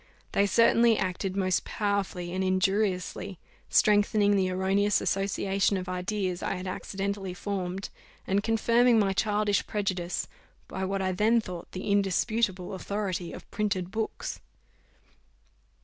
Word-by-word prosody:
They 200 - +3
certainly 230 +1 +5
acted 190 0 -2
most 185 -3 +1
powerfully 195 -4 -2
and 190 +1 -1
injuriously, 190 0 0 0.3
strengthening 205 0 +4
the 190 -2 +2
erroneous 190 +2 +2
association 195 0 0
of 185 -1 -5
ideas 185 0 -2
I - - -1
had 185 0 -6
accidentally 195 0 -4
formed, 190 -1 -4 0.4
and 195 +1 +1
confirming 230 +2 +3
my 200 -3 +3
childish 205 0 +1
prejudice 185 -4 -2 0.4
by 190 0 -3
what 195 0 -1
I 185 - +1
then 215 +5 +3
thought 180 -6 -7
the 190 +2 -3
indisputable 200 -1 +1
authority 190 -2 -3
of - - -11
printed 190 -4 -1
books. 220 +1 -3
195 Hz, 125 wpm, -28 LUFS, 185-205 Hz, 0.4 s, certainly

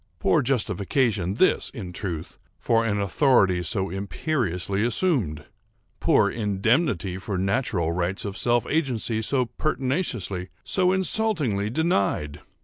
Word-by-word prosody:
Poor - - +2
justification 110 -5 0
this, 185 - +3
in 95 -7 -6
truth, 85 -4 -5 0.2
for 115 -1 +2
an 105 -2 0
authority 100 -3 +3
so 95 +3 -2
imperiously 100 - -2
assumed! 120 - 0 0.5
Poor - - +4
indemnity 105 - 0
for 100 0 -4
natural 95 -3 0
rights 90 +3 -2
of 100 -1 -4
self 120 +3 +1
agency 120 -7 -1
so 125 +3 +1
pertinaciously, 125 - -2
so 185 -1 +2
insultingly 185 - +1
denied! 100 - 0
105 Hz, 115 wpm, -25 LUFS, 95-135 Hz, 0.5 s, Poor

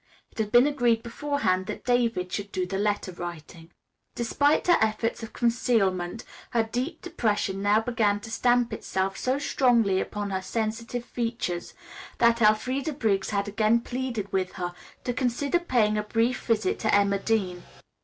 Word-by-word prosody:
It - - -13
had 210 -1 -1
been 240 +2 +7
agreed 245 -6 +2
beforehand 235 -7 -1
that - - -6
David 235 -7 +1
should 200 0 -4
do 185 - -1
the 195 +2 -3
letter 205 -2 0
writing. 170 -1 -8 0.5
Despite 285 +5 +2
her 350 -1 +5
efforts 220 +2 0
at 225 - -8
concealment, 225 -5 +1 0.3
her 235 -2 +2
deep 255 +9 -4
depression 210 - -1
now 205 +2 +3
began 220 -3 +1
to 225 - -9
stamp 245 0 +2
itself 190 0 -2
so 255 +2 0
strongly 235 -9 +2
upon 205 -1 -4
her 190 0 -1
sensitive 230 +4 -3
features, 230 -9 -3 0.4
that 235 0 +4
Elfreda 255 +7 +2
Briggs 210 -8 0
had 200 -1 -1
again 215 +3 +2
pleaded 245 -5 -4
with 185 -1 0
her 175 -1 -4 0.3
to 245 - -1
consider 265 +5 0
paying 225 -10 +1
a - - -2
brief 230 +3 0
visit 235 - +1
to 220 - +1
Emma 200 -1 +3
Dean. 195 -5 -1
225 Hz, 160 wpm, -26 LUFS, 200-245 Hz, 0.5 s, been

